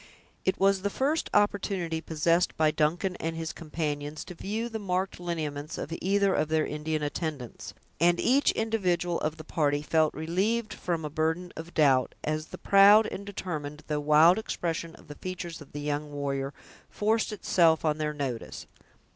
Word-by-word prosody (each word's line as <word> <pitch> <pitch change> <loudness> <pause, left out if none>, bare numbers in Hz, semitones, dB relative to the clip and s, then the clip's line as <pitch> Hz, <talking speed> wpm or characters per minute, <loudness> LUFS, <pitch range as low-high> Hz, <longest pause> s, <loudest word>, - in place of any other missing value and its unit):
It 190 - +1
was 195 0 +3
the 200 - 0
first 285 +9 0
opportunity 195 -5 +1
possessed 165 +2 +1
by 155 -1 +4
Duncan 165 +5 0
and 165 +1 -3
his 165 -1 -4
companions 150 -2 -4
to - - -8
view 215 +6 -3
the 225 -2 -5
marked 190 -2 -2
lineaments 155 -4 -4
of 165 - -5
either 200 +1 +2
of 155 - +1
their 155 0 +1
Indian 150 0 -2
attendants, 145 -9 -5 0.2
and 175 +1 +4
each 270 +4 +4
individual 180 -6 0
of 155 +1 -2
the 155 - -8
party 145 -2 0
felt 155 0 +2
relieved 200 +8 -1
from 170 -3 -3
a - - -3
burden 160 +4 -1
of 165 +2 -9
doubt, 135 -5 +3
as 155 +1 -2
the - - -9
proud 200 +2 +7
and 200 +1 -6
determined, 155 -6 -5
though 150 -1 -1
wild 155 +5 +6
expression 165 -5 -3
of - - -18
the 145 - -7
features 175 0 -6
of 145 - -13
the 145 - -6
young 145 0 -2
warrior 140 -1 -2 0.4
forced 220 +2 0
itself 165 -6 +3
on 155 0 +1
their 150 0 0
notice. 135 -6 -5
165 Hz, 170 wpm, -28 LUFS, 150-190 Hz, 0.4 s, proud